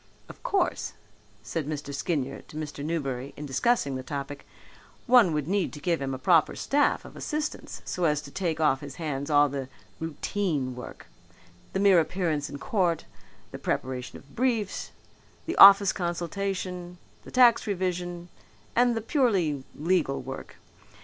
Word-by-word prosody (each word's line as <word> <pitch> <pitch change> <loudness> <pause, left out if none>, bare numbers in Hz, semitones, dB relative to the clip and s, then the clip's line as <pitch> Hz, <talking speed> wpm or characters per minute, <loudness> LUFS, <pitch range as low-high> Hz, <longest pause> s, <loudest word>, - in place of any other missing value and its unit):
"Of - - -13
course," 395 -8 0 0.5
said 160 -4 -3
Mr. 150 -2 -4
Skinyer 140 -2 -2
to 155 - -10
Mr. 150 -2 -5
Newberry 140 -5 -3
in 150 - -6
discussing 140 - +1
the 130 - -3
topic, 140 +1 -6 0.6
"one 240 -8 +6
would 150 -2 -1
need 195 0 0
to 150 - -8
give 165 +1 0
him 135 -1 -2
a - - -5
proper 160 +3 +3
staff 285 +1 +1
of - - -12
assistants 305 0 -4
so 180 - -1
as 150 -2 +2
to 140 - -11
take 170 -3 -2
off 150 -4 +3
his 140 -2 -8
hands 145 -3 -3
all 145 -1 +5
the 135 -2 -5 0.3
routine 160 -4 -2
work 125 - -9 0.7
the 190 - 0
mere 195 -3 +6
appearance 160 -4 -1
in 145 - -6
court, 175 -1 0 0.5
the - - -7
preparation 125 -1 -3
of 140 - -18
briefs, 230 -5 0 0.6
the 335 - -3
office 200 0 +9
consultation, 180 0 -3 0.3
the - - -11
tax 245 -3 +5
revision 180 -2 -2 0.5
and 245 -1 +3
the - - -1
purely 200 - +1
legal 155 -3 +1
work. 135 +1 -8
165 Hz, 155 wpm, -27 LUFS, 140-195 Hz, 0.7 s, office